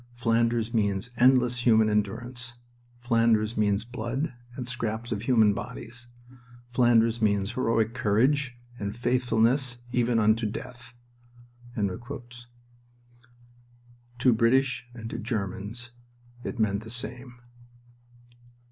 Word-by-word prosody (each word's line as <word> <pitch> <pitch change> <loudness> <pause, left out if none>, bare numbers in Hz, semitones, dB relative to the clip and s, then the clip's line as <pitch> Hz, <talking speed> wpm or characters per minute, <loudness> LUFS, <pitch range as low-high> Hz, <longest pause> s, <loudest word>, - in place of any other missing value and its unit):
Flanders 115 -1 +1
means 105 +1 0
endless 125 0 +4
human 110 -2 +5
endurance. 115 +4 -2 0.5
Flanders 115 -2 +2
means 105 0 +1
blood 120 +4 -3 0.2
and 125 -1 -5
scraps 120 -2 -3
of 105 -3 -2
human 110 -4 +4
bodies. 120 +1 -7 0.6
Flanders 120 -2 +3
means 100 -2 +1
heroic 115 -3 +1
courage 130 +4 +1 0.2
and 100 +1 -4
faithfulness 125 +1 +1
even 120 -1 +2
unto 110 0 +3
death." 125 +2 -9 0.8
To 110 +4 -3 2.1
British 125 +2 +2
and 115 -1 -7
to - - -4
Germans 110 +2 -4 0.5
it 125 - -5
meant 105 -2 +1
the 110 - -10
same. 120 +1 -2
115 Hz, 100 wpm, -27 LUFS, 110-125 Hz, 2.1 s, human